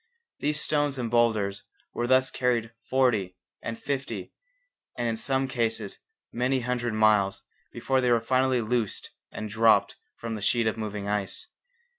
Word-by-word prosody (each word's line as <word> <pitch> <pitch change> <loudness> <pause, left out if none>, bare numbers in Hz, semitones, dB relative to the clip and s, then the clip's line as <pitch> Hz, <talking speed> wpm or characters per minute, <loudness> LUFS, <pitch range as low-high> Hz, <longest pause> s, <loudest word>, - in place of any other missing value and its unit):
These 150 +1 +2
stones 145 -2 +1
and 120 -3 -3
boulders 110 -4 +2 0.3
were 120 - -1
thus 130 +1 +4
carried 120 -2 0 0.2
forty 110 -9 +2 0.2
and 115 0 -5
fifty, 140 -1 -4 0.6
and 120 - -1
in 115 - 0
some 135 +3 0
cases 115 -4 -2 0.3
many 125 +2 +1
hundred 120 -2 -1
miles 105 -3 +3 0.3
before 130 -1 0
they 125 - +2
were 120 -1 +4
finally 130 +1 +2
loosed 115 -1 -2 0.2
and 110 - -5
dropped 110 +2 +3 0.2
from 115 -1 -5
the 110 - -5
sheet 115 +3 +2
of 110 - +1
moving 105 -2 -4
ice. 105 - -2
120 Hz, 150 wpm, -27 LUFS, 110-130 Hz, 0.6 s, thus